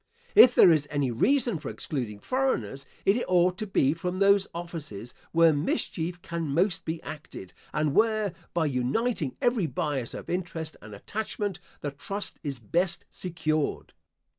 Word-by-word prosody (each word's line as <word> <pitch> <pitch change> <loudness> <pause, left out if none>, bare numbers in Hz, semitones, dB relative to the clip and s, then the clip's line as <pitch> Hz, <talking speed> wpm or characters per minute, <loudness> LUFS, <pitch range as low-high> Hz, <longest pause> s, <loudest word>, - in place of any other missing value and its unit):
If 245 -1 +8
there 175 - +8
is 150 -3 +2
any 145 -4 0
reason 235 - +2
for - - -6
excluding 125 - -4
foreigners, 140 - -1 0.2
it 215 +5 +3
ought 180 0 +3
to 215 - -3
be 140 -7 +3
from 180 +3 -3
those 200 0 +4
offices 155 - -7 0.2
where 165 -1 +5
mischief 170 +3 -2
can 170 -3 -3
most 165 +6 +1
be 160 +1 -3
acted, 150 - -9 0.2
and 150 -2 0
where, 215 -2 +2 0.2
by 170 -2 +1
uniting 145 - -1
every 240 -8 +2
bias 140 -4 -2
of - - -8
interest 165 -3 -3
and 105 0 -10
attachment, 205 - -3 0.2
the 145 - -3
trust 195 +9 -4
is 140 -3 -4
best 170 - 0
secured. 155 -4 -2
165 Hz, 150 wpm, -27 LUFS, 145-195 Hz, 0.2 s, If